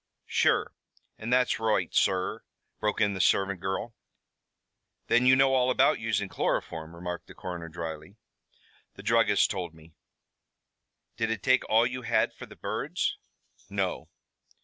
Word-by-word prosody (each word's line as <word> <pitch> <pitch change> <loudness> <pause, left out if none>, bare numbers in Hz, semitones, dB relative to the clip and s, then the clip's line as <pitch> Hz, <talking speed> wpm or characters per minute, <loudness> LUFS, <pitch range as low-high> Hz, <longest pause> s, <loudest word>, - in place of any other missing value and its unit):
"Sure, - - +2 0.5
and 115 +3 -4
that's 125 -1 +3
roight, 110 -1 0
sur," 95 -1 +1 0.4
broke 105 -1 -1
in 105 -1 +2
the 95 - -1
servant 100 -1 +2
girl. 95 +5 -3 1.2
"Then 120 +1 +4
you 130 - +8
know 135 0 +4
all 130 -1 +3
about 130 - +3
using 105 -3 -1
chloroform?" 80 -3 -2
remarked 90 0 -6
the - - -13
coroner 85 -2 -6
dryly. 80 +2 -7 0.8
"The - - -11
druggist 115 -3 +3
told 90 -4 -4
me." 80 0 -17 1.2
"Did 115 -1 0
it 110 -3 -3
take 130 0 +3
all 115 +2 +5
you 125 +1 -3
had 115 -1 +1
for - - -10
the - - -13
birds?" - - -2 0.5
"No." - - -2
105 Hz, 145 wpm, -28 LUFS, 90-115 Hz, 1.2 s, you